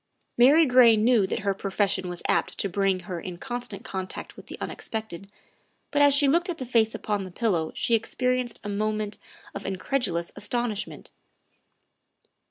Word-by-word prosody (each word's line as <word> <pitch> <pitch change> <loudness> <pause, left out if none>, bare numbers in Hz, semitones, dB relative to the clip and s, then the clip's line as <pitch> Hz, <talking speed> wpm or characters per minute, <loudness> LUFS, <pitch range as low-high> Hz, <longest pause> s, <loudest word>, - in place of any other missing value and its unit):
' - - -34
' - - -49
Mary 310 +5 +6
Gray 245 -4 +6
knew 220 -2 +3
that 220 - -3
her 200 -1 0
profession 195 -1 -1
was 175 -1 -5
apt - - 0
to - - 0
bring 195 0 0
her 175 -1 -6
in 180 -2 -7
constant 245 -2 -6
contact 190 -1 -6
with - - -14
the - - -8
unexpected, 210 -4 -5 0.6
but 290 - +2
as 285 0 +6
she 280 +1 +6
looked 340 +6 +2
at 345 - -3
the 260 - -5
face 225 -2 +2
upon 205 -2 -2
the 185 - -7
pillow 175 -5 -1
she 235 - 0
experienced 250 +1 0
a - - -6
moment 215 0 -2 0.3
of - - -6
incredulous 185 -3 -1
astonishment. 220 0 -3
215 Hz, 175 wpm, -26 LUFS, 195-245 Hz, 0.6 s, Mary